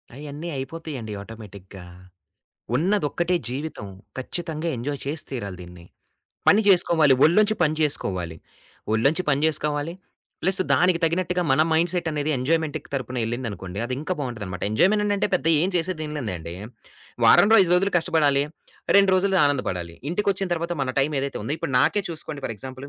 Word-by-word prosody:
అయన్నీ 150 +4 -7
అయిపోతయండి 135 -5 -6
ఆటోమేటిక్‌గా. 100 -3 -11 0.9
ఉన్నది 185 +5 +1
ఒక్కటే 175 +3 0
జీవితం 140 -3 -5 0.3
ఖచ్చితంగా 160 +4 -4
ఎంజాయ్ 140 +4 -4
చేసి 145 +3 -2
తీరాలి 100 -8 -5
దీన్ని. 90 -1 -12 0.6
పని 205 - +6
జేసుకోవాలి 165 -6 +5
ఒళ్ళొంచి 210 +7 +4
పని 155 -2 +2
చేసుకోవాలి. 90 - -1 0.6
ఒళ్ళొంచి 140 +11 +2
పని 140 -1 +2
జేసుకోవాలి 150 0 0 0.5
ప్లస్సు 190 0 +3
దానికి 180 -1 +3
తగినట్టుగా 180 +2 0
మన 135 +3 +4
మైండ్‌సెట్ 170 +1 +1
అనేది 150 0 -1
ఎంజాయ్‌మెంట్‌కి 155 +4 -1
తరపున 130 -2 -3
ఎళ్ళిందనుకోండి 110 -6 -5
అదింకా 135 +8 -3
బావుంటదనమాట. 105 -9 -5
ఎంజాయ్‌మెంట్ 200 - +3
అననంటే 205 0 0
పెద్ద 175 - -1 0.2
ఏం 180 - +1
చేసేదేంలేదండి 150 - -3 0.7
వారంలో 220 +2 +7
5 175 - 0
రోజులు 195 +3 +2
కష్టబడాలి, 155 -5 +2 0.5
2 200 -1 +5
రోజులుది 190 0 +2
ఆనందపడాలి. 95 -12 -1 0.2
ఇంటికొచ్చిన 195 +1 0
తర్వాత 170 +1 -3
మన 130 - -1
టైమ్ 145 +3 +1
ఏదైతే 140 0 -3
ఉందో 135 +8 -2
ఇప్పుడు - - -4
నాకే 205 +10 +2
చూసుకోండి 155 -3 -7
ఫర్ 115 - -5
ఎగ్జాంపులు, 130 +5 -8
150 Hz, 140 wpm, -24 LUFS, 125-175 Hz, 0.9 s, వారంలో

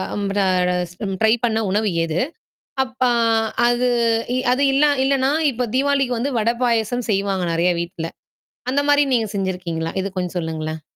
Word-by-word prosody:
அம் 205 - -2
ர - - +3 0.5
ச - - -17 0.3
ட்ரை 220 0 +5
பண்ண 225 -2 +1
உணவு 210 +2 +1
எது? 165 +1 -1 0.6
அப்ப 255 0 -13 0.7
அது 240 +1 +2 0.5
இ - - +1
அது 265 +3 +2
இல்லா 295 +2 +4
இல்லன்னா, 270 0 +2 0.2
இப்போ 245 +1 -2
தீவாளிக்கு 270 -2 +1
வந்து 270 +5 -1
வடை 230 +2 +1
பாயசம் 235 0 0
செய்வாங்க, 195 -2 0
நெறையா 175 +2 +2
வீட்டுல. 170 -1 -5 0.6
அந்த 280 +2 +2
மாரி 290 0 +5
நீங்க 230 -3 +1
செஞ்சிருக்கீங்களா? 180 -4 -3
இது 195 - -2
கொஞ்சம் 180 0 -3
சொல்லுங்களேன். 160 -1 -4
220 Hz, 155 wpm, -21 LUFS, 180-255 Hz, 0.7 s, ட்ரை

